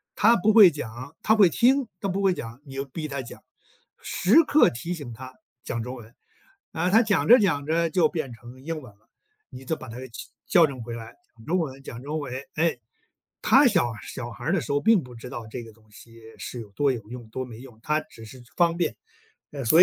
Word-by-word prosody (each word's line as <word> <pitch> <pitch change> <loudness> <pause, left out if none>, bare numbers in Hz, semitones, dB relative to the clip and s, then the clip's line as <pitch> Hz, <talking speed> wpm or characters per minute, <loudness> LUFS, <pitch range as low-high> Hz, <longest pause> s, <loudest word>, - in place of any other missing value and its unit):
他 225 +4 +5
不 215 +1 +3
会 210 -5 +9
讲， 130 +1 -8
他 220 - +4
会 200 -5 +6
听， 250 - +3
他 195 - -1
不 195 +2 -1
会 195 -2 +3
讲， 115 -6 -8
你 135 - -11
就 135 - -2
逼 155 +3 -6
他 140 -2 -4
讲。 120 - -11 0.6
时 280 - +4
刻 300 0 +5
提 150 +10 -5
醒 145 -8 -7
他 130 +3 -10 0.3
讲 115 -2 -3
中 125 +3 -6
文， 115 -1 -13 0.6
啊， 175 +3 0
他 225 +4 +6
讲 210 -4 +1
着 245 - +9
讲 165 - +1
着 165 +1 +1
就 175 +1 +3
变 155 -7 -4
成 120 +3 -13
英 165 0 -4
文 125 -7 -13
了， 105 +3 -36 0.4
你 130 - -11
就 160 - -1
把 130 - -11
他 115 +2 -8
其 115 - -9 0.2
矫 175 -5 +6
正 135 -4 -7
回 115 +1 -6
来， 115 0 -8 0.2
“讲 115 - -16
中 175 +7 0
文， 135 -5 -4
讲 120 -2 -9
中 150 +3 -3
文”。 135 -4 -6 0.2
诶， 160 -6 +1 0.6
他 275 +2 +6
小 175 - +2
小 120 -2 -7
孩 120 +2 -9
儿 165 - +1
的 195 - +2
时 135 - -8
候 145 - +2
并 220 -2 +4
不 125 -2 -12
知 115 +2 -9
道 120 -2 -7
这 120 +1 -6
个 115 - -13
东 110 0 -26
西 115 +2 -15 0.2
是 120 - -6
有 105 -3 -10
多 140 +7 +1
有 120 - -4
用， 120 -2 -8
多 130 +4 -4
没 120 -3 -10
用， 125 -3 -13
他 150 +3 +1
只 115 -8 -14
是 125 +3 -12
方 170 -1 +3
便。 175 -2 -1 0.6
呃， 140 -3 -5
所 160 +9 +7
140 Hz, 250 characters per minute, -25 LUFS, 120-175 Hz, 0.6 s, 会